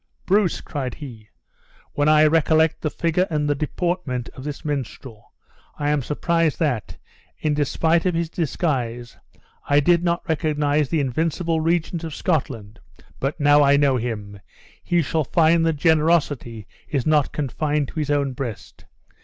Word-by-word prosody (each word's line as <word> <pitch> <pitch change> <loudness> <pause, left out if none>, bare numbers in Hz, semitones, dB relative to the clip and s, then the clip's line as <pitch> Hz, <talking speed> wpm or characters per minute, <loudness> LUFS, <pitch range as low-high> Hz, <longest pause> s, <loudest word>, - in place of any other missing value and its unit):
"Bruce," 195 -2 +2
cried 130 -5 -5
he, 120 -8 -11 0.6
"when 145 +1 +2
I 155 0 +6
recollect 160 0 +3
the 155 - -1
figure 170 +4 0
and 150 -2 -1
deportment 150 -4 -2
of 130 - -11
this 150 +2 -6
minstrel, 130 -5 -6 0.5
I 145 0 0
am 150 -1 +1
surprised 165 +4 0
that, 140 -9 -2 0.4
in 150 - -1
despite 160 +4 +1
of 180 - 0
his 170 0 0
disguise, 130 -8 -3 0.5
I 145 0 +5
did 170 +3 +3
not 170 -1 -1
recognize 150 -2 0
the 160 - +1
invincible 160 +4 -1
Regent 170 +1 0
of 160 -3 -5
Scotland; 120 - -2 0.4
but 140 +4 -2
now 145 0 +5
I 140 0 +5
know 140 -2 +3
him, 105 -4 -5 0.4
he 175 -1 +1
shall 155 +2 0
find 165 +5 +3
that 165 - +2
generosity 150 - +1 0.2
is 135 -5 -1
not 150 -2 +2
confined 150 0 -1
to 165 - -5
his 150 -2 -2
own 140 -2 +1
breast. 125 -5 -7
150 Hz, 150 wpm, -22 LUFS, 135-165 Hz, 0.6 s, I